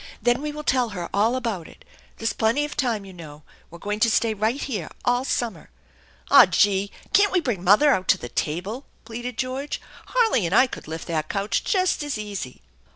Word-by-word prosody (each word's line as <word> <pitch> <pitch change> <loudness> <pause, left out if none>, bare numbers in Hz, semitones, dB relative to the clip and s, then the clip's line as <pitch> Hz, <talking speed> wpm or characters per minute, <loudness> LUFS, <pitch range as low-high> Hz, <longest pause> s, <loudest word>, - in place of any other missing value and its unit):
Then 240 +3 +1
we 300 0 -3
will 300 +1 -7
tell 250 -4 +1
her 170 -1 -5
all 220 +5 +2
about 225 -10 -3
it. - - -17 0.3
There's 225 0 -1
plenty 230 +7 +1
of 295 - -7
time, 230 -6 -1
you 190 - -11
know. 155 -4 -11 0.3
We're 170 - -11
going 205 +4 -4
to 230 - +4
stay 225 0 +2
right 220 +6 -1
here 210 - -4 0.2
all 245 +1 +2
summer." 240 -4 -3 0.6
"Aw, - - +9
gee! 200 -1 +2 0.2
Can't 405 0 +5
we 370 - +3
bring 235 - -3
mother 210 +11 +6
out 185 -7 0
to - - +4
the - - -7
table 190 - -3
?" - - -37
pleaded 240 +1 -6
George. 265 +3 -3 0.3
"Harley 450 - +2
and 180 - 0
I 260 - +7
could 255 - -9
lift 160 +1 -6
that 155 -2 -2
couch 200 +2 -1
just 370 -5 +1
as 290 -5 -3
easy." 200 - -6
225 Hz, 210 wpm, -24 LUFS, 190-260 Hz, 0.6 s, Aw